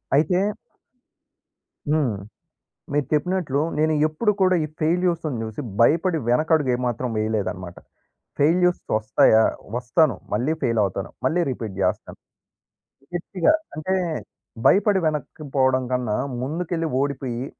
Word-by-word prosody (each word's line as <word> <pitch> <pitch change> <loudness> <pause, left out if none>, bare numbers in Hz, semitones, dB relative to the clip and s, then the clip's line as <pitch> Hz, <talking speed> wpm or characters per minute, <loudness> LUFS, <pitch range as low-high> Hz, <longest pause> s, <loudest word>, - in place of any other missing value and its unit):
అయితే 155 +5 +3 1.5
హ్మ్. 140 -9 +1 0.8
మీరు 145 -2 +1
చెప్పినట్లు, 150 -2 0 0.2
నేను 155 +1 +2
ఎప్పుడు 155 +8 +1
కూడా, 185 -1 +4
ఈ - - -1
ఫెయిల్యూర్స్‌ని 165 -4 0
జూసి, 110 +3 -5 0.2
భయపడి 165 +7 +3
వెనకడుగేమాత్రం 125 -3 +1
వేయలేదనమాట. 105 -5 -2 0.6
ఫెయిల్యూర్స్‌ 175 +4 +3
వస్తాయా? 110 0 +4 0.3
వస్తాను. 125 - +2 0.2
మళ్ళీ 125 +9 +1
ఫెయిలవుతాను. 100 -6 0 0.2
మళ్ళీ 175 +2 +2
రిపీట్ 110 -6 -6
జేస్తాను. 90 -1 -1 1.0
గట్టిగా 175 - +1 0.2
అంటే, 155 +5 -2 0.7
భయపడి 200 -1 +5
వెనక్కి 155 0 -4
పోవడం 130 -1 +3
కన్నా, 125 -4 0 0.3
ముందుకెళ్ళి 165 +4 -2
ఓడిపోయి, 130 -3 -3
145 Hz, 100 wpm, -23 LUFS, 120-165 Hz, 1.5 s, భయపడి